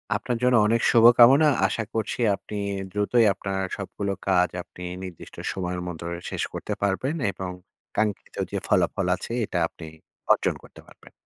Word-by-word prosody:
আপনার 120 -2 -2
জন্য 125 0 +4
অনেক 115 +1 +2
শুভকামনা। 120 +5 +7 0.2
আশা 115 - -2
করছি 110 +1 -2 0.2
আপনি 105 - -10 0.4
দ্রুতই 105 +4 +2
আপনার 95 0 -3 0.2
সবগুলো 100 0 -4 0.2
কাজ 90 -1 +3
আপনি 90 - -12 0.2
নির্দিষ্ট 90 -3 -10 0.2
সময়ের 90 -1 -3
মধ্যে 85 -1 -6 0.2
শেষ - - -3
করতে - - -4
পারবেন 100 +10 0 0.2
এবং 95 0 -6 0.5
কাঙ্ক্ষিত 105 -2 -2 0.2
যে - - -2
ফলাফল 95 - +1
আছে, 95 - -8
এটা 95 - -4
আপনি 80 - -12 0.5
অর্জন - - 0
করতে - - -15
পারবেন। - - -18
100 Hz, 150 wpm, -25 LUFS, 95-115 Hz, 0.5 s, শুভকামনা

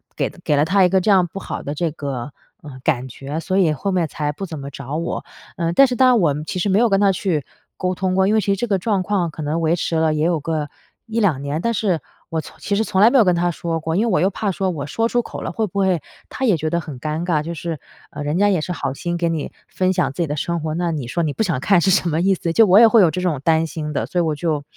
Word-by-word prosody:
给 - - -1
给 150 - +2
了 145 - +3
她 190 +4 +3
一 180 - +4
个 190 +1 +3
这 210 - +2
样 185 -3 +4
不 195 - -8
好 - - -5
的 145 - -4
这 165 +1 -1
个， 140 -3 -5 0.3
呃， 140 -4 -10
感 130 0 0
觉， 135 +5 -6
所 185 +4 -1
以 170 -5 +3
后 175 +8 -3
面 180 -3 +1
才 150 0 -3
不 195 +7 -6
怎 165 -4 -7
么 140 0 -6
找 140 0 -7
我。 165 +2 -3 0.3
呃， 170 -1 -1
但 275 - +7
是 250 - -2
当 260 +2 +5
然 250 -2 +5
我 160 -7 +3
其 185 - -4
实 200 - 0
没 195 +2 +3
有 240 - +4
跟 195 -1 +3
她 200 -1 +4
去 175 -6 -1 0.3
沟 185 0 -1
通 185 0 -1
过。 190 0 +3
因 210 - +2
为 220 - +4
其 - - -5
实 200 - +2
这 240 +5 -2
个 200 -3 +2
状 195 -1 0
况 185 -3 0
可 155 - -8
能 150 +2 -1
维 165 0 +2
持 165 -1 -2
了 160 -1 +2
也 155 0 0
有 170 -2 +1
个 150 -1 -3 0.4
1-2 205 -11 +1
年， 140 +2 -2
但 235 +4 0
是 195 -7 0 0.3
我 165 - -2
从 - - -13
其 200 - -1
实 215 - +2
从 190 -3 0
来 220 - +8
没 270 - +3
有 240 - +7
跟 180 - +4
她 175 +1 +1
说 165 0 -3
过， 160 +1 -2
因 210 +5 +2
为 230 - 0
我 - - +2
又 190 - +3
怕 200 +1 -2
说 190 +1 -1
我 150 -5 -4
说 225 +10 0
出 245 - +1
口 - - -8
了， - - -4
会 220 - -1
不 200 +1 -4
会 190 -4 +2 0.3
她 265 - -3
也 215 -7 +4
觉 155 +1 -2
得 170 +1 0
很 150 -6 -8
尴 155 +3 -3
尬？ 165 -4 +1
就 170 - -5
是， 165 -1 -4 0.3
呃， 145 - -7
人 150 +4 -1
家 205 +1 +4
也 185 -5 +1
是 180 - -4
好 140 -6 -3
心 175 +4 -3
跟 170 -1 0
你 155 -3 -4 0.2
分 185 0 0
享 160 -7 0
自 155 - -4
己 165 - 0
的 150 - -2
生 170 +3 -2
活， 155 0 -3
那 175 0 -1
你 145 -6 -4
说 170 +7 -1
你 150 -3 -1
不 - - -3
想 165 -9 -1
看 180 +5 +3
是 195 - +2
什 180 -1 +2
么 160 +1 0
意 190 +1 +3
思？ 170 -2 -3
就 225 - +6
我 190 +3 +7
也 230 - +9
会 225 -1 +5
有 180 - +5
这 180 - -3
种 165 -7 -1
担 160 0 +3
心 150 0 -5
的， - - -1
所 180 - -2
以 - - +4
我 155 -2 0
就 150 -1 -1
170 Hz, 335 characters per minute, -20 LUFS, 155-195 Hz, 0.4 s, 也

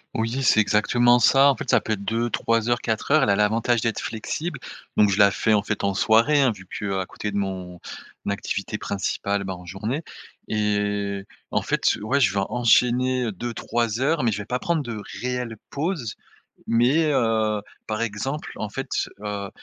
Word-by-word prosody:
Oui 115 +4 -1
c'est 115 -4 +4
exactement 120 +4 +4
ça 135 +3 +6
en 135 - -1
fait 150 -5 -7
ça - - +5
peut 110 - -2
être 100 -1 -4
2-3 115 0 0
heures, 120 0 +2
4 110 +5 -2
heures, 155 -1 +6
elle 105 - +2
a 100 - +4
l'avantage 110 +3 +2
d'être 115 -2 -1
flexible 150 +10 -4 0.4
donc 105 -2 +5
je 95 - 0
la 100 -1 +7
fais 110 +2 +1
en 105 - +4
fait 105 0 -3
en 100 -1 +1
soirée 115 +8 +4
hein, 130 -3 +4
vu 95 -3 -10
qu'à 95 -1 -3
côté 105 - -5
de 100 - -3
mon 95 -3 -4 0.5
activité 100 +1 -3
principale 100 0 -2
ben 95 -1 -4
en 90 0 -11
journée, 105 - -3 0.5
et 105 -2 -1 0.3
en - - +1
fait, - - +1
ouais 130 +7 +1
je 105 -8 +3
vais 100 - 0
enchaîner 125 0 +2
2-3 115 +2 -2
heures 150 +1 +2
mais 115 - +2
je 105 - -3
vais 100 - -5
pas 125 - -1
prendre 165 +3 0
de 115 -5 -5 0.2
réelle 125 -2 -3
pause, 145 - -3 0.5
mais 135 +7 +3
heu, 110 -5 +1 0.2
par 110 0 -3
exemple 115 +7 -3
en 105 - -4
fait, 135 +5 -5 0.3
heu, 100 -1 -4
110 Hz, 185 wpm, -24 LUFS, 105-125 Hz, 0.5 s, la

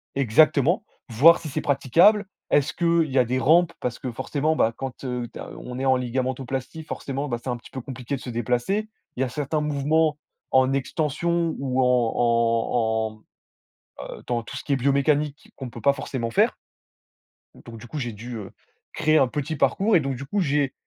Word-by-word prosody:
exactement, 140 - +3 0.3
voir 150 +9 +6
si 155 - -7
c'est - - -3
praticable. 175 - +4 0.2
Est-ce 145 -2 +2
qu'il 170 -3 +1
y 130 - -1
a 125 - +4
des 130 +2 -1
rampes? 170 +4 +4
Parce 125 -2 -3
que 130 - -4
forcément, 145 +6 -1
bah, 115 -6 +2
quand, 135 0 -7
heu, 125 -2 -3
tu - - -10
as, - - -7
heu, - - -11
on 125 0 -7
est 135 - -2
en 130 -1 +4
ligamentoplastie, 130 +4 -3
forcément, 140 -2 -4
ben, 120 - -2
c'est 130 - -4
un 120 - -1
petit 120 - -15
peu 130 - -6
compliqué 130 +1 -5
de 130 - -8
se - - -7
déplacer. 125 - -1 0.3
Il - - -1
y - - +4
a 130 - -2
certains 145 +4 -2
mouvements 150 +1 +1 0.3
en 130 0 +4
extension 160 +4 0
ou 130 -1 0
en 125 -2 +2
en 115 -2 +1 0.9
en, - - -8
heu, - - -14
dans 120 -1 -1
tout - - -9
ce - - -5
qui 145 - -2
est - - +4
biomécanique 140 +2 0
qu'on 130 - -6
peut 120 - -9
pas 140 +4 +4
forcément 130 -4 -4
faire - - +2 1.1
donc 115 -1 -10
du 120 - -11
coup, 150 - -5
j'ai 120 -4 -3
dû, 115 +3 -7
heu, 100 -3 -8 0.4
créer 155 0 +3
un 135 - +4
petit 150 +4 -3
parcours 200 +7 +2
et - - +6
donc, 135 -3 -2
du 135 +3 -7
coup, 200 +8 -1
j'ai, 145 -3 +1
135 Hz, 205 wpm, -24 LUFS, 120-150 Hz, 1.1 s, voir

